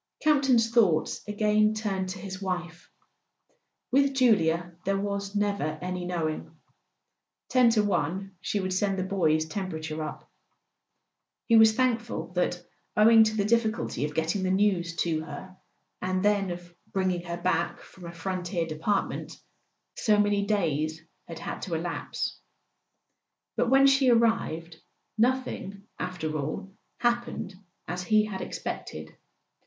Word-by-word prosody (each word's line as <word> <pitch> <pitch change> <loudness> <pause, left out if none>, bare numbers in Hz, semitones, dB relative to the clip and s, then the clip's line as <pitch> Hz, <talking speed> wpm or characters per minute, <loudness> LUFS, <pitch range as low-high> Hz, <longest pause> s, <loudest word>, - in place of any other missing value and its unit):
Campton's 270 -7 +4
thoughts 195 -10 +3
again 215 +1 +2
turned 195 -4 -2
to 190 - -5
his 190 0 -7
wife. 175 -2 -4 1.0
With 275 +1 +3
Julia 175 -9 +3
there 195 +1 +1
was 200 0 -3
never 200 -7 0
any 180 +1 -4
knowing. 165 -3 -3 0.9
Ten 250 -2 +5
to 220 -2 +3
one 195 0 -1
she 205 +2 -1
would 185 -1 -2
send 195 +1 +1
the 185 - 0
boy's 160 -5 +1
temperature 160 -4 -4
up. 155 - -6 1.2
He 230 - +4
was 220 -1 +7
thank¬ 250 -2 +2
ful 170 -8 -6
that, 180 0 0 0.3
owing 225 +1 +8
to 220 0 -1
the 200 - +1
difficulty 220 - 0
of 150 0 -6
getting 165 +5 0
the 185 - 0
news 185 -3 +1
to 160 -2 -1
her, 185 +3 -9 0.5
and 185 +1 -1
then 200 -2 +2
of 175 0 -7 0.2
bringing 185 -2 0
her 170 0 -4
back 170 -1 -1
from 180 - -14
a - - -6
frontier 175 0 -3
de¬ 155 -1 -7
partment, 200 +4 -1 0.6
so 210 -2 +3
many 205 -1 +2
days 160 -6 0 0.3
had 165 - -7
had - - -6
to 175 -4 -3
elapse. 170 +2 -3 1.2
But 245 - +1
when 270 +1 +6
she 270 -1 +5
arrived, 225 -9 +1 0.4
nothing, 235 -5 0 0.2
after 160 -4 -3
all, 155 +7 -4 0.2
happened 240 -4 -1 0.3
as 175 +2 -3
he 215 +3 +3
had 195 -3 -5
expected. 80 - -6
190 Hz, 140 wpm, -28 LUFS, 170-215 Hz, 1.2 s, owing